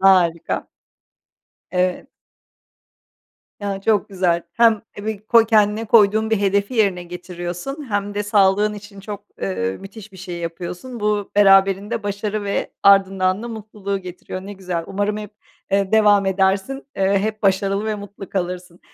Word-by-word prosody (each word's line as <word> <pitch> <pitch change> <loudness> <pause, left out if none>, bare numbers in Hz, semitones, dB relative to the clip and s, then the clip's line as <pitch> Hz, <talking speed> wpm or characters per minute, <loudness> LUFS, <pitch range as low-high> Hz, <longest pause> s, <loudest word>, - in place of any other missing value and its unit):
Harika. 180 -4 +3 1.0
Evet. 180 0 0 1.5
Ya 200 -1 -3
çok 210 0 +1
güzel. 180 -3 +1
Hem 225 -3 +4 0.2
ebi 215 0 -5
koy 230 -1 +5
kendine 215 0 +3
koyduğun 220 0 +4
bir 220 - +2
hedefi 200 +4 +1
yerine 195 -5 +2
getiriyorsun 180 - -6
hem 205 0 -1
de 205 - -1
sağlığın 205 0 +3
için 205 -1 -11
çok, 205 0 -7 0.2
ııı, 95 0 -2
müthiş 200 +1 -11
bir - - -13
şey 180 -2 -7
yapıyorsun. 175 +8 -6
Bu 210 -1 0
beraberinde 195 +2 +4
başarı 205 +1 -3
ve 200 - -2
ardından 195 0 +4
da 240 - -5
mutluluğu 210 -3 -5
getiriyor. 185 0 -8
Ne 200 +2 -8
güzel, 180 -4 -4
umarım 205 +2 -1
hep, 210 -1 -7 0.4
ııı, 195 +1 +1
devam 205 -2 +5
edersin, 195 +8 0
ııı, 195 +1 +2
hep 215 +1 -3
başarılı 195 +1 +1
ve 215 -1 -1
mutlu 200 -1 -9
kalırsın. 180 -1 -4
200 Hz, 145 wpm, -21 LUFS, 190-210 Hz, 1.5 s, koy